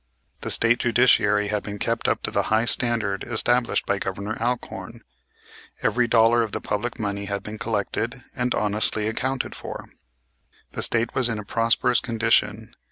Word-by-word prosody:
The - - -5
State 115 +1 +2
judiciary 110 -4 +3
had 105 -1 0
been 105 -1 -6
kept 115 +3 -1
up - - 0
to - - -1
the - - +2
high 110 +1 +3
standard 115 -6 0
established 120 +1 +1
by 100 - 0
Governor 100 +3 -4
Alcorn. 120 +1 -3 0.8
Every 125 -1 +2
dollar 115 0 +4
of 110 -3 -3
the - - -1
public 110 +4 -3
money 100 -2 -3
had 100 0 -3
been 110 0 -7
collected, 110 +1 -2 0.2
and 125 -1 0
honestly 105 0 0
accounted 130 +4 -2
for. - - -7 0.9
The - - -4
State 115 0 +1
was 125 -2 +3
in 115 - -2
a 105 - -6
prosperous 115 +3 +2
condition. 110 -2 0
115 Hz, 165 wpm, -24 LUFS, 105-120 Hz, 0.9 s, dollar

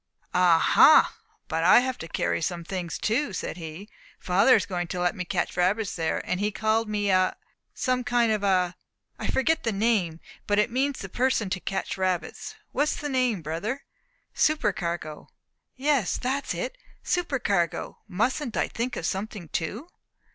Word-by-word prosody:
"Ah 180 -2 +5
ha! - - +6 0.3
but 165 +1 -1
I 185 +7 +7
have 260 -1 -3
to 165 - -6
carry - - -1
some 170 +1 -2
things 175 -1 -4
too," 235 +2 0
said 180 - -4
he. 165 +4 -8 0.3
"Father 195 +8 +4
is 205 - +1
going 175 -3 -3
to 180 - -4
let 175 0 +1
me 180 - -3
catch 175 0 -1
the - - 0
rabbits 200 +3 +1
there; 160 -2 -2
and 180 - -1
he 210 +1 0
called 220 +1 0
me 205 -1 0
a, 185 0 +3 0.4
some 255 0 0
kind 240 -2 +2
of 215 -2 0
a; 185 -3 +2 0.4
I - - -3
forget 320 +5 +1
the 225 - -1
name, 195 -6 +1 0.3
but 205 - +2
it 210 +2 +2
means 270 +3 0
the 195 - -5
person 235 -2 0
to 185 - -1
catch 190 +2 -3
rabbits. 185 - -2 0.2
What 290 +3 +1
is - - -1
the 295 - -4
name, 250 - +1
brother?" 200 - -3 0.5
"Supercargo?" 175 - -1 0.5
"Yes, 275 -6 +1
that's 270 +3 -2
it - - -4 0.2
supercargo. 240 - -1
Mustn't 240 +6 -1
I - - +1
think 245 +2 -3
of - - -4
something 195 -3 -4
too?" 210 - -3
205 Hz, 175 wpm, -26 LUFS, 180-250 Hz, 0.5 s, I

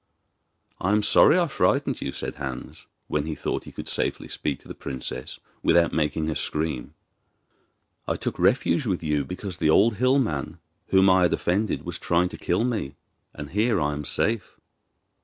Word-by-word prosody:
'I 95 +3 +1
am 105 0 +3
sorry 160 - +6
I 175 - +3
frightened 150 - +1
you,' 70 - -2
said - - -5
Hans, 65 -3 -7 0.2
when 75 0 -1
he 80 - -3
thought - - -3
he - - -10
could - - -8
safely - - -2
speak 70 -3 -3
to - - -17
the - - -7
princess 65 -1 -6 0.2
without 85 0 +3
making 75 0 0
her 80 - 0
scream. 75 -5 -3 1.1
'I - - 0
took - - -4
refuge 130 +3 +2
with 90 -4 -1
you 75 -2 +1
because 90 +5 -6
the 75 - +1
old 105 +6 +4
hill 130 +3 +3
man, 80 - -1 0.3
whom 95 0 +5
I 95 0 +5
have 90 - +3
offended, 100 +4 0
was - - -5
trying 90 +1 +1
to - - -8
kill 90 +6 0
me, 115 - -2 0.4
and 75 -1 -7
here 110 +3 +2
I 75 -1 0
am 75 0 -4
safe. 110 +9 0
85 Hz, 180 wpm, -25 LUFS, 75-105 Hz, 1.1 s, sorry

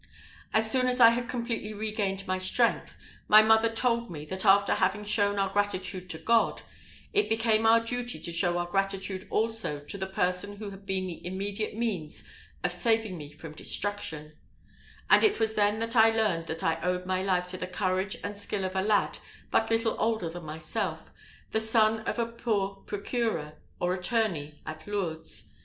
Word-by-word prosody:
As 220 0 +2
soon 255 0 +2
as 250 0 +1
I 230 -2 +10
had 240 +1 -1
completely 230 -3 -3
regained 205 -2 -2
my 185 0 0
strength, 185 - 0 0.3
my 215 +1 +8
mother 220 +1 +5
told 235 0 0
me, 150 -3 -7
that 190 +5 -3
after 200 0 +5
having 200 +3 +1
shown 205 -1 +1
our 195 -1 +1
gratitude 195 -2 -1
to 165 - -4
God, 230 +6 +2 0.5
it 415 0 +2
became 225 0 +2
our 225 +1 +7
duty 245 +1 -3
to 170 - -4
show 175 +1 +1
our 175 - 0
gratitude 195 +1 -2
also 225 -9 0
to 145 +7 -9
the 190 - -2
person 190 +2 -1
who 205 -1 -6
had 195 0 -13
been 190 -1 0
the 175 -2 -7
immediate 200 +4 -3
means 195 -10 -2 0.4
of - - +1
saving 225 -4 +1
me 150 -3 -8
from 155 +1 -10
destruction; 160 -5 -2 0.8
and - - +6
it 425 -2 +3
was 220 -1 +2
then 215 +2 +1
I 225 -2 +7
learned 210 -7 +1
that 160 0 -4
I 165 - 0
owed 180 0 -1
my 185 0 0
life 185 -2 +1
to 185 - -5
the 180 - -4
courage 185 +1 -1
and 205 0 -4
skill 200 -1 -3
of 185 0 -4
a 190 - +2
lad 210 +1 +1 0.3
but 225 - +2
little 225 0 +1
older 220 -6 0
than 175 -1 -8
myself, 155 +1 -3 0.5
the 220 - +1
son 220 0 +3
of - - -1
a 235 - +1
poor 210 -4 -2
procureur, 205 -7 -2 0.3
or 175 +1 +1
attorney, 180 -7 -1
at 155 +4 -8
Lourdes. 170 -6 -4
200 Hz, 185 wpm, -28 LUFS, 180-225 Hz, 0.8 s, I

